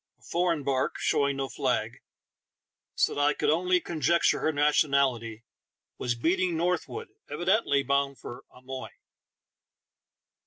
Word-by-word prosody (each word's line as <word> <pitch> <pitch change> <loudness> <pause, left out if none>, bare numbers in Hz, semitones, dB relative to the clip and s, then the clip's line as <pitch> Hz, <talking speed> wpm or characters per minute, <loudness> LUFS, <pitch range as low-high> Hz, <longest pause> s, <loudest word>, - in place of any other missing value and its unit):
A - - -27
foreign 170 -3 0
bark, 130 -1 0
showing 140 -1 +1
no 135 -1 -2
flag, - - -2 1.0
so - - +2
that 145 - -2
I 145 +1 +3
could - - +1
only 180 +3 +2
con 170 -3 -6
jecture 170 +5 +3
her 155 - +1
nationality, 140 -6 +1 0.6
was 120 -1 -1
beating 175 +6 0
northward, 175 +1 -2 0.2
evidently 175 -2 +1
bound 140 0 0
for 120 - -9
Amoy. 130 +1 -8
145 Hz, 125 wpm, -28 LUFS, 135-170 Hz, 1.0 s, I